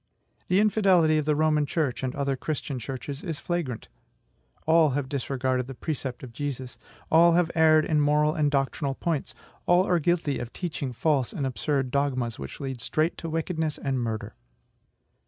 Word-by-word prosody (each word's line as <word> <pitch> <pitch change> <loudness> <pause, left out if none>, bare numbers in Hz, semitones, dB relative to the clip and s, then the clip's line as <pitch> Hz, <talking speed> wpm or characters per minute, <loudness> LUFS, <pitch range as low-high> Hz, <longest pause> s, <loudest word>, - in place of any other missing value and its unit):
The 185 - +3
infidelity 190 -7 +4
of 150 - -2
the 150 -1 +2
Roman 155 -1 +2
church 145 -6 -1
and 130 -1 -3
other 140 -1 0
Christian 140 -1 -4
churches 135 +3 -6
is 165 -5 -4
flagrant; 165 -10 -3 0.8
all 160 -1 +5
have 140 -2 -2
disregarded 130 -2 -1
the 135 - -7
precept 135 -3 -4
of 120 -3 -9
Jesus; 130 -1 -5 0.3
all 170 +1 +6
have 170 -1 +2
erred 155 -1 +5
in 155 -2 +2
moral 150 +1 +3
and 150 -2 +1
doctrinal 135 0 -1
points; 165 -2 -2 0.3
all 175 +1 +5
are 180 -3 +2
guilty 165 -3 0
of 120 0 -6
teaching 155 -7 -4
false 130 +1 +1
and 140 - -3
absurd 135 0 -1
dogmas, 130 - -1
which 70 0 -7
lead 135 -3 -5
straight 155 +7 0
to 165 - -5
wickedness 160 -1 -2
and 135 -2 -2
murder. 115 -2 -3
145 Hz, 170 wpm, -26 LUFS, 130-160 Hz, 0.8 s, all